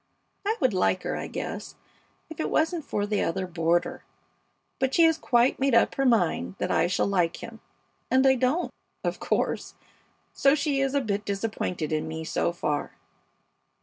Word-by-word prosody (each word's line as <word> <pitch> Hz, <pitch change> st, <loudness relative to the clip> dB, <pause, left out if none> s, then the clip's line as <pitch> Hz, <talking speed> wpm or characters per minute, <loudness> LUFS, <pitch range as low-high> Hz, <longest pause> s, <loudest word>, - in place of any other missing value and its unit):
I 440 Hz, +2 st, +1 dB
would 255 Hz, -7 st, +2 dB
like 185 Hz, 0 st, +1 dB
her, -, -, -2 dB
I -, -, -4 dB
guess, -, -, -6 dB, 0.5 s
if 320 Hz, -, -11 dB
it -, -, -1 dB
wasn't 325 Hz, +1 st, +1 dB
for 205 Hz, -7 st, -2 dB
the 205 Hz, 0 st, 0 dB
other 190 Hz, +3 st, -1 dB
boarder; 170 Hz, -1 st, 0 dB, 0.8 s
but 265 Hz, 0 st, 0 dB
she 335 Hz, -, +6 dB
has 325 Hz, -1 st, +5 dB
quite 245 Hz, -2 st, +2 dB
made 270 Hz, -2 st, +2 dB
up -, -, +4 dB
her 270 Hz, -1 st, +1 dB
mind 175 Hz, -, +1 dB
that -, -, -2 dB
I -, -, +3 dB
shall 180 Hz, -, +1 dB
like 180 Hz, -4 st, 0 dB
him, 230 Hz, -1 st, -9 dB, 0.5 s
and 260 Hz, +1 st, +4 dB
I 265 Hz, -, +7 dB
don't, 260 Hz, +7 st, 0 dB, 0.3 s
of -, -, -2 dB
course, -, -, -1 dB, 0.6 s
so 275 Hz, +1 st, +4 dB
she 285 Hz, -2 st, 0 dB
is 270 Hz, 0 st, 0 dB
a 280 Hz, -, +3 dB
bit 205 Hz, -4 st, -2 dB
disappointed 195 Hz, -6 st, -3 dB
in 155 Hz, -, -1 dB
me 160 Hz, 0 st, -5 dB
so 160 Hz, -, 0 dB
far. 150 Hz, -4 st, -2 dB
225 Hz, 180 wpm, -26 LUFS, 175-275 Hz, 0.8 s, I